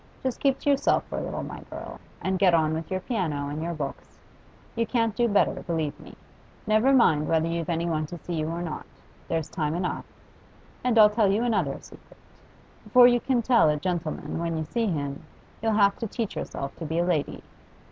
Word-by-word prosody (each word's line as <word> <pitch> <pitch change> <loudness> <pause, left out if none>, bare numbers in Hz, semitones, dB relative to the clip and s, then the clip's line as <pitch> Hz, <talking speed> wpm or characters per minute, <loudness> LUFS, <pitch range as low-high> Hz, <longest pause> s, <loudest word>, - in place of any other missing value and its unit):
Just 260 -2 -2
keep 275 -1 +2
to - - -9
yourself 275 - +2
for - - -4
a - - -4
little, - - -4
my - - -7
girl, - - -8 0.2
and 190 0 0
get 180 -3 +5
on 160 -1 +2
with 160 0 -4
your 185 0 -2
piano 160 - -2
and 150 +2 -4
your 170 +1 -3
books. 140 -3 -6 0.6
You 230 -1 0
can't 230 -4 0
do 240 +2 +2
better, 205 -2 +2
believe 160 -5 -2
me. - - -13 0.5
Never 215 +5 +3
mind 160 - +4
whether 165 0 +2
you've 165 0 -2
any 170 0 0
one 155 -2 -1
to 175 - -7
see 175 +2 -6
you 155 -1 -1
or 170 +2 -3
not; 160 -3 -6 0.4
there's 160 -2 -1
time 155 -3 -1
enough. 180 +1 -2 0.8
And 245 -2 +2
I'll 210 -1 +8
tell 210 -2 +3
you 215 +4 +1
another 240 -2 0
secret. - - -16 0.7
Before 250 -1 +7
you 245 0 +4
can 245 -1 0
tell 235 -9 +5
a 150 - +1
gentleman 170 -1 -3
when 165 -1 -2
you 160 - -1
see 230 +9 -1
him, 140 -6 -3 0.4
you'll 225 0 +1
have 200 -1 +3
to 225 - -2
teach 225 0 -4
yourself 140 0 -5
to 165 - -6
be 160 +2 -2
a 175 - +2
lady. 160 -6 -1
175 Hz, 210 wpm, -26 LUFS, 160-225 Hz, 0.8 s, I'll